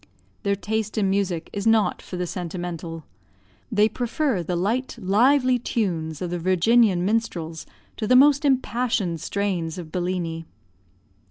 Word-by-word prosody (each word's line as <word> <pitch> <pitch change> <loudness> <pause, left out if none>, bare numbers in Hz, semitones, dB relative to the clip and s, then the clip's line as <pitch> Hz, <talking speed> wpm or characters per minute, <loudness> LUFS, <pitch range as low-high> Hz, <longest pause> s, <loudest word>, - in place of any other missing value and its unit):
Their 200 0 +1
taste 215 +1 -3
in 195 -3 +2
music 190 -4 -1
is 200 +1 -2
not 225 -2 +3
for 180 - -7
the 180 - -1
sentimental; 175 -2 -5 0.7
they 210 -1 +4
prefer 245 - -1
the 175 +1 -3
light, 225 +9 -1
lively 250 +6 +3
tunes 170 -10 -2
of 175 - -4
the 175 - -2
Virginian 185 +2 +3
minstrels 175 -7 -2 0.3
to 215 - -2
the 250 - +5
most 285 +3 +6
impassioned 240 - 0
strains 185 -4 -2
of 165 -3 -8
Bellini. 175 -2 -3
195 Hz, 140 wpm, -24 LUFS, 175-230 Hz, 0.7 s, most